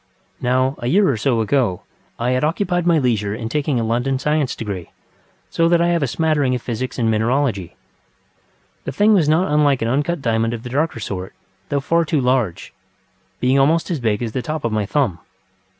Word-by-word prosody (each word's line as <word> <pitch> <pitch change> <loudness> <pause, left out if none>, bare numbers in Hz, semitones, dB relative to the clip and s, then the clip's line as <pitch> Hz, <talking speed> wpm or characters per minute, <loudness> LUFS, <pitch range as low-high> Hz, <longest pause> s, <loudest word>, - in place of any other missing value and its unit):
Now, 130 +2 +1
a 120 - -3
year 195 +9 +4
or 135 - +2
so 115 +1 +1
ago, 110 -5 0 0.3
I 120 +2 0
had 130 +2 0
occupied 175 +2 0
my 170 -2 +4
leisure 110 -7 0
in 115 0 -5
taking 145 -2 0
a - - -1
London 120 +4 0
science 150 -1 0
degree, 100 -6 -5 0.6
so 165 0 +2
that 170 0 +4
I 170 0 +2
have 170 -1 +1
a 140 - +1
smattering 145 -1 +1
of 125 - -4
physics 125 +1 -4
and 115 -3 +1
mineralogy. 110 -4 0 1.1
The - - -4
thing 210 +1 +4
was 165 -7 +3
not 160 +1 +2
unlike 145 -4 +3
an - - 0
uncut 145 +7 0
diamond 115 -2 0
of 115 - -9
the 125 - -7
darker 145 -2 -1
sort, 95 -3 -5 0.3
though 140 -1 0
far 170 +4 +2
too 155 -2 0
large, 125 -9 0 0.7
being 130 +2 +2
almost 160 +6 +2
as 165 - -1
big 110 -2 0
as 115 - -3
the 130 - -2
top 155 +1 -4
of 115 - 0
my 105 -2 -1
thumb. 120 - 0
130 Hz, 200 wpm, -20 LUFS, 115-150 Hz, 1.1 s, year